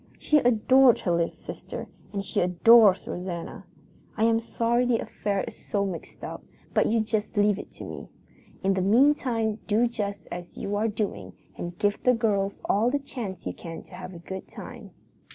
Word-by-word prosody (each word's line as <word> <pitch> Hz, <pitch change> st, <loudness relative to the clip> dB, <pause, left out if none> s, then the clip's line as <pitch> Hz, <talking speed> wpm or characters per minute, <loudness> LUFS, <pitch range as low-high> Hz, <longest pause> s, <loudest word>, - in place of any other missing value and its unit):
"She 305 Hz, -, +3 dB
adored 250 Hz, +1 st, +5 dB
her 175 Hz, -, 0 dB
little 170 Hz, -1 st, +2 dB
sister, -, -, -8 dB, 0.2 s
and 200 Hz, -1 st, -3 dB
she -, -, -1 dB
adores 195 Hz, +3 st, +6 dB
Rosanna. 180 Hz, +2 st, -5 dB, 0.5 s
I 220 Hz, -, +1 dB
am 225 Hz, 0 st, +4 dB
sorry 235 Hz, +1 st, 0 dB
the 245 Hz, -2 st, +2 dB
affair 200 Hz, -3 st, -2 dB
is -, -, -8 dB
so 200 Hz, -1 st, -2 dB
mixed 185 Hz, -4 st, -7 dB
up, -, -, -6 dB, 0.3 s
but -, -, +3 dB
you 225 Hz, +1 st, +2 dB
just 215 Hz, -1 st, -2 dB
leave 205 Hz, -1 st, +3 dB
it -, -, -9 dB
to -, -, -9 dB
me. -, -, -8 dB, 0.5 s
In 195 Hz, +1 st, +3 dB
the 190 Hz, -, 0 dB
meantime 225 Hz, 0 st, +3 dB
do 220 Hz, +3 st, +3 dB
just 205 Hz, -5 st, -4 dB
as 175 Hz, 0 st, -7 dB
you 205 Hz, +1 st, -3 dB
are 215 Hz, +2 st, +1 dB
doing 195 Hz, -, -3 dB, 0.2 s
and 175 Hz, 0 st, -6 dB
give 205 Hz, 0 st, 0 dB
the 250 Hz, -1 st, +4 dB
girls 200 Hz, -4 st, 0 dB
all 220 Hz, +4 st, +2 dB
the 285 Hz, -, +1 dB
chance 235 Hz, -9 st, -6 dB
you 90 Hz, -, -3 dB
can 165 Hz, -, -8 dB
to -, -, -19 dB
have 185 Hz, 0 st, -8 dB
a -, -, -7 dB
good 190 Hz, +3 st, -7 dB
time. -, -, -10 dB
205 Hz, 190 wpm, -26 LUFS, 190-230 Hz, 0.5 s, adores